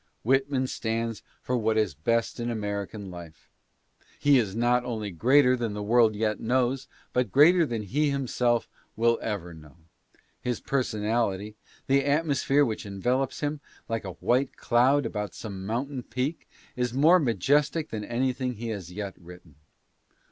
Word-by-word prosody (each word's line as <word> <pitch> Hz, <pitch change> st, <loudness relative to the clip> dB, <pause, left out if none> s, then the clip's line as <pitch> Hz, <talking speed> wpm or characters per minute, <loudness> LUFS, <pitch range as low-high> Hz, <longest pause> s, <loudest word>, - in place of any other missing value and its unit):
Whitman 135 Hz, +2 st, +2 dB
stands 115 Hz, -2 st, -3 dB, 0.2 s
for 125 Hz, -, -1 dB
what 110 Hz, -2 st, +1 dB
is 105 Hz, -7 st, +1 dB
best 115 Hz, -, -1 dB
in 120 Hz, 0 st, -2 dB
American 100 Hz, -2 st, -4 dB
life. 85 Hz, -3 st, -11 dB, 0.7 s
He 145 Hz, -2 st, +5 dB
is 105 Hz, -4 st, -2 dB
not 120 Hz, +1 st, +2 dB
only 110 Hz, -4 st, -4 dB
greater 130 Hz, -, +4 dB
than 115 Hz, -4 st, -3 dB
the 105 Hz, -, -4 dB
world 110 Hz, 0 st, +4 dB
yet 105 Hz, 0 st, -1 dB
knows, 125 Hz, +2 st, 0 dB, 0.3 s
but 125 Hz, -5 st, 0 dB
greater 165 Hz, -, +6 dB
than 115 Hz, -4 st, -3 dB
he 145 Hz, +9 st, 0 dB
himself 125 Hz, -3 st, 0 dB, 0.3 s
will 115 Hz, +1 st, +2 dB
ever 95 Hz, -6 st, -4 dB
know. 75 Hz, -2 st, -15 dB, 0.6 s
His 125 Hz, -2 st, -2 dB
personality 110 Hz, -5 st, -1 dB, 0.2 s
— -, -, -28 dB
the 135 Hz, +1 st, +3 dB
atmosphere 145 Hz, -1 st, +2 dB
that 110 Hz, -4 st, -3 dB
envelops 125 Hz, +7 st, -1 dB
him, 145 Hz, 0 st, -2 dB, 0.3 s
like 115 Hz, 0 st, -2 dB
a 95 Hz, -2 st, -6 dB
white 125 Hz, +10 st, 0 dB
cloud 130 Hz, +3 st, +3 dB
about 105 Hz, -2 st, -4 dB
some 95 Hz, -3 st, -7 dB
mountain 130 Hz, +4 st, -2 dB
peak 130 Hz, +7 st, -4 dB
— -, -, -28 dB
is 125 Hz, -1 st, -2 dB
more 160 Hz, +7 st, +6 dB
majestic 145 Hz, -, +1 dB
than 110 Hz, -2 st, -4 dB
anything 125 Hz, +2 st, -1 dB
he 115 Hz, +2 st, -5 dB
has 95 Hz, -6 st, -5 dB
yet 100 Hz, +1 st, -5 dB
written. 90 Hz, -2 st, -14 dB
120 Hz, 155 wpm, -27 LUFS, 105-130 Hz, 0.7 s, greater